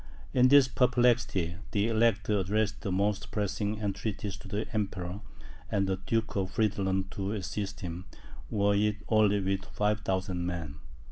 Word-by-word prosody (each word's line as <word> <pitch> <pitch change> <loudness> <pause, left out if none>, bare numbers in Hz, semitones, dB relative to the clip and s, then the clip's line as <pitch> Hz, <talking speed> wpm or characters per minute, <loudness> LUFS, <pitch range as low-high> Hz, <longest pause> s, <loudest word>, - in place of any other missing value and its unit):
In 125 0 +6
this 140 0 +7
perplexity, 120 -9 +2
the 105 +1 +1
Elector 110 -2 +2
addressed 105 +1 0
the 100 - -3
most 100 +1 0
pressing 105 0 -1
entreaties 105 -1 -3
to - - -12
the 105 +3 -2
Emperor 100 -2 -3 0.5
and 100 -1 +1
the 95 0 0
Duke 115 +3 -1
of 95 -2 0
Friedland 95 -3 0
to 100 +1 -3
assist 100 0 -4
him, 90 +1 -5 0.4
were 100 -1 +2
it 105 +1 +2
only 105 -2 +4
with 95 0 -1
5,000 95 -4 -1
men. 85 -4 -4
100 Hz, 145 wpm, -30 LUFS, 95-110 Hz, 0.5 s, this